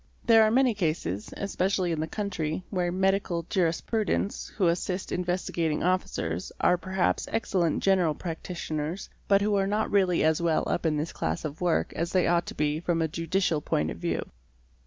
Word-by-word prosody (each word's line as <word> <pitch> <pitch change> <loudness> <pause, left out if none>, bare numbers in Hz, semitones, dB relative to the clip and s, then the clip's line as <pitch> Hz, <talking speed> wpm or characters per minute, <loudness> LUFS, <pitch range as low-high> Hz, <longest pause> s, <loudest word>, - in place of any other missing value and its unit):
There 225 -1 +7
are 215 - +5
many 250 +1 +3
cases, 155 - -2
especially 190 -2 0
in 160 - -1
the 160 - -1
country, 180 -5 -3
where 180 -3 0
"medical 190 -2 +1
jurisprudents" 195 +4 0
who 195 - +2
assist 180 +2 -1
Investigating 175 -3 -1
Officers 95 - -1
are 180 - +4
perhaps 185 +1 -1
excellent 185 -7 0
general 180 -6 +3
practitioners, 165 0 -4 0.2
but 200 -1 +4
who 210 0 +1
are 195 -1 +2
not 210 +2 0
really 185 -4 +3
as 160 +1 +2
well 165 -2 +2
up 170 - 0
in 155 -1 +1
this 155 +3 -3
class 80 - -2
of 155 +2 -6
work 175 -2 +1
as 170 +1 -3
they 185 -2 +3
ought 170 0 +2
to - - -6
be 150 +1 0
from 175 0 0
a 160 - +1
judicial 165 0 0
point 75 - 0
of - - -7
view. - - -2
175 Hz, 180 wpm, -27 LUFS, 160-195 Hz, 0.2 s, There